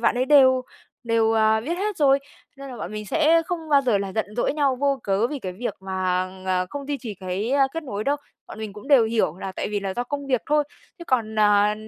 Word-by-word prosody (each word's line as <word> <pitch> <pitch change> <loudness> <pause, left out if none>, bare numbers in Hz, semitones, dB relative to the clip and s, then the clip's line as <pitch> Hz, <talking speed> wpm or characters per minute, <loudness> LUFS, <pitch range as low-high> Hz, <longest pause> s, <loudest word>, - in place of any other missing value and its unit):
bạn 230 - +2
ấy 255 - +2
đều 260 -2 +5 0.4
đều, 225 -1 +2
à, 220 0 +3
biết 335 +9 -3
hết 415 0 -2
rồi, 275 -2 +4 0.4
nên 275 0 -9
là 250 - -8
bọn 215 - -6
mình 210 -1 -6
sẽ 325 +6 +3
không 330 -3 -4
bao 285 -2 +5
giờ 240 -6 +2
là 195 -1 -4
giận 220 - -1
dỗi - - +1
nhau 280 -3 +1
vô 275 0 0
cớ 200 +3 +1
vì 290 +3 -5
cái 185 -7 -5
việc 235 +7 -4
mà, 185 -1 -1 0.2
ờ, 185 -1 +1
không 285 -1 -6
duy 285 -1 -2
trì 225 -4 -6
cái, 190 +4 -4
a, 275 -1 +4
kết 330 - -4
nối 215 -7 -5
đâu, 285 +1 +1 0.3
bọn - - -10
mình 215 -2 -6
cũng 210 +6 -11
đều 270 -6 +6
hiểu 220 -7 0
là 190 -1 -5
tại - - -4
vì 205 -1 -2
là 195 -1 -4
do 245 - -2
công 285 +2 -5
việc 255 -3 +1
thôi. 300 0 +2 0.3
Chứ 340 - -9
còn, 225 -7 -1
à, 210 0 +4
235 Hz, 260 wpm, -23 LUFS, 205-280 Hz, 0.4 s, đều